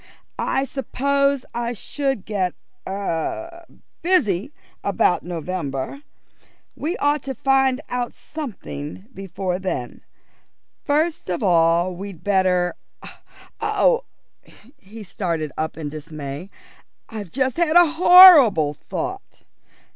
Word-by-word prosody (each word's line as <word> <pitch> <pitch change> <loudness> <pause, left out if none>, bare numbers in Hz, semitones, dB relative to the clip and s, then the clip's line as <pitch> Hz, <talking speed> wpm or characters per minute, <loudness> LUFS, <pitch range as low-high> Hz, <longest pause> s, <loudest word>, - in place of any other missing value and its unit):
"I 270 - 0
suppose 280 0 0
I 240 0 -2
should 270 -1 -3
get 190 -4 -2 0.3
er 200 - -4 0.4
busy 270 - +1 0.3
about 195 -2 +1
November. 170 - -4 0.7
We 325 +5 -3
ought 290 0 +1
to 270 -1 -5
find 270 +1 +2
out 245 -1 -3
something 195 - -8
before 190 -2 -4
then. 180 -10 -4 0.8
First 310 - 0
of 180 +4 -2
all 170 0 +3
we'd 190 -2 -9
better 185 -3 +2 0.9
Oh!" - - +2 0.7
He 220 -1 -11
started 170 -6 -3
up 160 +1 -3
in 155 -2 -4
dismay. 155 +1 -7 0.6
"I've 210 -4 -7
just 260 - -1
had 335 -2 +1
a 350 0 +8
horrible 320 - +8
thought. - - -7
200 Hz, 100 wpm, -22 LUFS, 175-280 Hz, 0.9 s, a